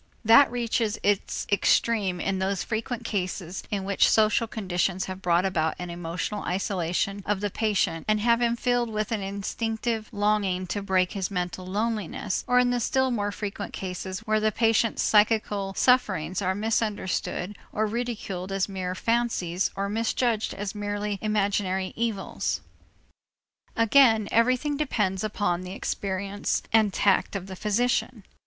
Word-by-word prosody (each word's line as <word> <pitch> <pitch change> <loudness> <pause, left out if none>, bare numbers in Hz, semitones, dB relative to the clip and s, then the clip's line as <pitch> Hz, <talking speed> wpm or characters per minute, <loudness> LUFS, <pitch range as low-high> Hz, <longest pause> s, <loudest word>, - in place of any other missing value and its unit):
That 230 +6 +7
reaches 230 -2 -1
its 205 -1 0
extreme 200 -2 +2
in 190 +1 -1
those 190 0 -1
frequent 230 +2 -3
cases 185 -4 -3
in 200 -2 -2
which 200 0 +3
social 220 +1 +3
conditions 190 -3 -1
have 185 0 -7
brought 175 0 +2
about 160 -4 0
an 180 -1 -6
emotional 175 +4 -4
isolation 190 +1 -1
of 205 -1 +1
the 205 0 -2
patient 195 -7 0
and 215 0 +3
have 235 +2 +3 0.2
filled 245 0 +1
him 220 - -7
with 215 +1 -1
an 220 -3 -1
instinctive 220 +3 -3
longing 205 -3 +1
to 200 +3 -3
break 190 -2 +1
his 195 -2 -2
mental 180 -1 -3
loneliness, 210 -1 -2
or 250 - +3
in 250 0 +4
the 245 - +1
still 260 +2 +1
more 205 -3 -1
frequent 205 -1 -5
cases 185 +1 -5
where 215 -1 +1
the 215 0 +2
patient's 225 0 +2
psychical 210 -2 +2
sufferings 190 -9 +2
are 190 0 0
misunderstood 210 -2 -1 0.2
or 215 - 0
ridiculed 210 -5 -4
as 195 -1 0
mere 185 -2 -4
fancies 225 -6 0
or 200 0 -1
misjudged 225 +1 0
as 200 0 -4
merely 205 -1 -3
imaginary 200 -3 0
evils. 225 -4 -2 1.1
Again 230 -2 +5
everything 255 +5 +2
depends 210 -10 0
upon 205 -4 -1
the 185 0 -7
experience 200 +1 -2
and 220 -2 +5
tact 200 +1 +2
of 190 -2 -3
the 190 -1 -8
physician. 230 +2 0
205 Hz, 150 wpm, -26 LUFS, 190-225 Hz, 1.1 s, That